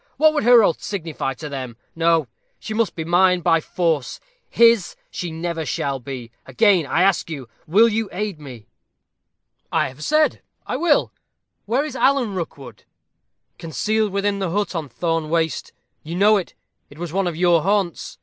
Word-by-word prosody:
What 310 Hz, 0 st, +5 dB
would 295 Hz, -, 0 dB
her 240 Hz, -2 st, +7 dB
oath 170 Hz, -, +1 dB
signify 160 Hz, -8 st, -4 dB
to 150 Hz, +4 st, -7 dB
them? 130 Hz, -5 st, -6 dB, 0.2 s
No; 165 Hz, -3 st, +2 dB, 0.3 s
she 220 Hz, -, -6 dB
must 225 Hz, -1 st, 0 dB
be 160 Hz, -, -4 dB
mine 180 Hz, +1 st, +3 dB
by 165 Hz, 0 st, +3 dB
force. 160 Hz, -6 st, -1 dB, 0.3 s
His 230 Hz, -5 st, +4 dB, 0.2 s
she 175 Hz, -, -4 dB
shall 165 Hz, -, -6 dB
never 160 Hz, -5 st, -3 dB
be. 125 Hz, -2 st, -8 dB, 0.2 s
Again, 195 Hz, -9 st, +3 dB
I 175 Hz, -, +2 dB
ask 195 Hz, -3 st, +2 dB
you, 140 Hz, -6 st, -6 dB, 0.2 s
will 210 Hz, +9 st, +5 dB
you 225 Hz, -2 st, -1 dB
aid 200 Hz, -3 st, -4 dB
me?" 125 Hz, -7 st, -11 dB, 1.1 s
"I -, -, +1 dB
have 135 Hz, +4 st, -11 dB
said 305 Hz, -, +2 dB, 0.2 s
I -, -, -3 dB
will. 305 Hz, +2 st, +2 dB, 0.6 s
Where 255 Hz, +7 st, +1 dB
is 285 Hz, -4 st, -6 dB
Alan 260 Hz, -6 st, +2 dB
Rookwood?" 140 Hz, -, -7 dB, 0.8 s
"Concealed 215 Hz, +6 st, -1 dB
within 200 Hz, +1 st, -1 dB
the 190 Hz, -2 st, -1 dB
hut 205 Hz, +4 st, -1 dB
on 160 Hz, -5 st, -4 dB
Thorne 165 Hz, +4 st, -2 dB
Waste. 165 Hz, -1 st, -1 dB, 0.3 s
You 165 Hz, +3 st, -7 dB
know 205 Hz, +4 st, +5 dB
it 190 Hz, -, -5 dB, 0.3 s
it 145 Hz, -, -15 dB
was 170 Hz, -1 st, -6 dB
one 195 Hz, -1 st, +1 dB
of 170 Hz, -, -3 dB
your 175 Hz, -2 st, +4 dB
haunts." 195 Hz, -2 st, -1 dB
175 Hz, 170 wpm, -21 LUFS, 155-210 Hz, 1.1 s, her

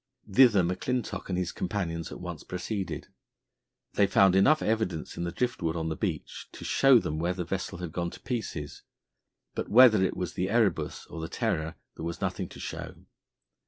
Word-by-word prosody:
Thither 105 Hz, -2 st, +6 dB
McClintock 100 Hz, +9 st, -2 dB
and 90 Hz, -, -1 dB
his 90 Hz, -1 st, -1 dB
companions 85 Hz, -4 st, -3 dB
at -, -, -7 dB
once 90 Hz, -3 st, -6 dB
proceeded. 95 Hz, +2 st, -4 dB, 0.8 s
They 100 Hz, -, +4 dB
found 95 Hz, -1 st, +5 dB
enough 145 Hz, +11 st, +5 dB
evidence 105 Hz, -7 st, -1 dB
in 85 Hz, -, -3 dB
the 85 Hz, -, -2 dB
drift 120 Hz, +6 st, -2 dB
wood 80 Hz, -1 st, 0 dB
on 80 Hz, -1 st, -2 dB
the 80 Hz, -, -2 dB
beach -, -, -4 dB
to -, -, -9 dB
show 135 Hz, -2 st, +6 dB
them 80 Hz, -8 st, -1 dB
where 90 Hz, +2 st, 0 dB
the 90 Hz, -, -2 dB
vessel 95 Hz, 0 st, -3 dB
had 90 Hz, -2 st, -5 dB
gone 85 Hz, +1 st, -2 dB
to -, -, -11 dB
pieces; 95 Hz, -, -4 dB, 0.7 s
but -, -, -4 dB
whether 115 Hz, -3 st, +7 dB
it 95 Hz, -, 0 dB
was 90 Hz, -1 st, -3 dB
the 95 Hz, +1 st, -1 dB
Erebus 110 Hz, -2 st, +1 dB
or 80 Hz, -, -8 dB
the 80 Hz, -, -5 dB
Terror, 90 Hz, -10 st, -1 dB, 0.2 s
there -, -, -6 dB
was 85 Hz, 0 st, -4 dB
nothing -, -, -2 dB
to -, -, -11 dB
show. -, -, -6 dB
90 Hz, 190 wpm, -28 LUFS, 85-110 Hz, 0.8 s, whether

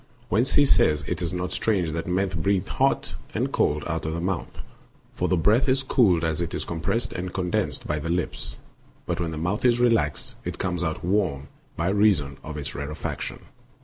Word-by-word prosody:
Whence 115 Hz, +8 st, +2 dB
he 145 Hz, -, +6 dB
says 75 Hz, -, +4 dB
it 90 Hz, 0 st, -2 dB
is 85 Hz, -1 st, -1 dB
not 90 Hz, 0 st, -3 dB
strange 95 Hz, -7 st, +1 dB
that 85 Hz, +1 st, -3 dB
men 95 Hz, +2 st, +1 dB
breathe 95 Hz, +2 st, 0 dB
hot -, -, +1 dB, 0.2 s
and -, -, 0 dB
cold 75 Hz, 0 st, +1 dB
out 80 Hz, -1 st, -2 dB
of 80 Hz, +1 st, -2 dB
the -, -, -2 dB
mouth; 90 Hz, 0 st, -3 dB, 0.5 s
for -, -, -1 dB
the 90 Hz, -, +2 dB
breath 110 Hz, -, +3 dB
is 130 Hz, +1 st, +2 dB
cooled 100 Hz, -, +3 dB
as 80 Hz, 0 st, 0 dB
it 85 Hz, -, -2 dB
is -, -, -3 dB
compressed 100 Hz, +9 st, -1 dB
and 90 Hz, +1 st, -4 dB
condensed 90 Hz, -2 st, -1 dB
by 75 Hz, 0 st, -1 dB
the 80 Hz, +2 st, -4 dB
lips, 90 Hz, 0 st, -2 dB, 0.5 s
but -, -, -2 dB
when 85 Hz, -1 st, -1 dB
the 80 Hz, -, -5 dB
mouth 90 Hz, +7 st, -1 dB
is 120 Hz, -1 st, +4 dB
relaxed, 115 Hz, -, +1 dB
it -, -, -4 dB
comes 90 Hz, -2 st, -1 dB
out 80 Hz, 0 st, -2 dB
warm 90 Hz, -8 st, 0 dB, 0.3 s
by 85 Hz, +3 st, 0 dB
reason 95 Hz, -9 st, +3 dB
of 75 Hz, -1 st, -6 dB
its 70 Hz, -, -4 dB
rare 70 Hz, +2 st, -4 dB
faction. -, -, -5 dB
90 Hz, 205 wpm, -25 LUFS, 80-100 Hz, 0.5 s, he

